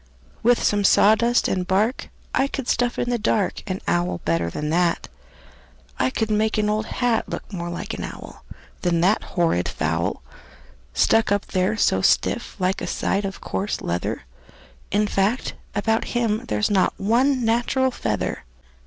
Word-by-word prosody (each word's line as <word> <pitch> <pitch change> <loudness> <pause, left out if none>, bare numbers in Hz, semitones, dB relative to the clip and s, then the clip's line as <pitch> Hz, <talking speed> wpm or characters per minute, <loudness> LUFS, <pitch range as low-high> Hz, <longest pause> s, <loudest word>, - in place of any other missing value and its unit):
"With 240 +1 +3
some 205 -1 +2
sawdust 220 +5 +4
and 180 -1 -1
bark 210 +7 0 0.2
I 270 - +2
could 270 -2 -5
stuff 245 0 +1
in 245 - -1
the 240 - 0
dark 115 - 0
An - - -3
owl 85 +1 0
better 85 0 +1
than 150 - -3
that. 170 0 +1 0.9
I 130 - +2
could 220 - -2
make 215 +1 +1
an 210 0 +1
old 215 +1 -1
hat 240 -2 0
Look - - -6
more 175 -2 -4
like 175 - -5
an - - -5
owl - - -9 0.4
Than 170 -2 +1
that 195 +5 +3
horrid 165 - 0
fowl, - - -2 0.7
Stuck 225 -2 +3
up 205 0 +1
there 185 +4 0
so 95 - +2
stiff - - +1
like 185 +1 0
a - - -3
side 200 +1 -1
of 195 - -6
coarse 200 +2 -2
leather. 85 0 -3 0.7
In 210 +2 +2
fact, 205 +4 0 0.2
about 220 +2 +1
him 225 -2 0
there's 105 - 0
not 190 -2 +2
one 245 +5 +2
natural 240 +3 +1
feather." 105 - -2
205 Hz, 160 wpm, -23 LUFS, 170-225 Hz, 0.9 s, sawdust